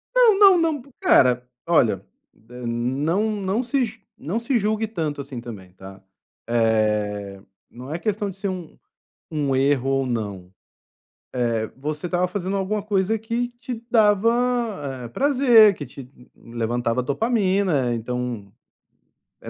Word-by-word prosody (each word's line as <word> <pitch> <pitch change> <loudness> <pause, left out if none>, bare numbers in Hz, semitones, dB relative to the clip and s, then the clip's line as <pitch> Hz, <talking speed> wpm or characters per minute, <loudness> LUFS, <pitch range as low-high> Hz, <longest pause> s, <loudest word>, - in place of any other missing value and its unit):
Não, 465 -5 +6
não, 390 -3 +8
não 320 -5 0
p 280 - -18
cara, 125 - +4 0.2
olha, 120 - +2 0.4
eh, 125 0 -8
não 140 - 0
não 205 +3 -1
se 260 0 +1
ju 225 -1 -11 0.2
não 185 +10 -3
se 235 +1 0
julgue 215 +1 0
tanto 155 -9 -3
assim 135 -3 -7
também, 100 -6 -10
tá. 95 0 -12 0.5
Eh, 105 -4 0 0.3
não 130 +5 -8
é - - -2
questão 210 0 -1
de 190 - -10
ser 200 0 -3
um 180 -4 -7 0.5
um 145 -3 0
erro 135 -1 +2
ou 135 -1 +1
não. 100 -7 -4 1.0
Eh, 110 -1 -1
você 150 +4 -4
estava 180 +1 +1
fazendo 190 +1 -3
alguma 200 +2 -1
coisa 205 +1 0
que 230 +2 -2
te 235 -1 -7
dava, 215 -1 +4 0.7
eh, - - -6
prazer, 245 - +5
que 145 - -7
te 130 -2 -11 0.3
levantava 120 +1 -2
dopamina. 185 - +1
Então, 120 -3 -4 0.9
é - - -8
160 Hz, 140 wpm, -23 LUFS, -, 1.0 s, não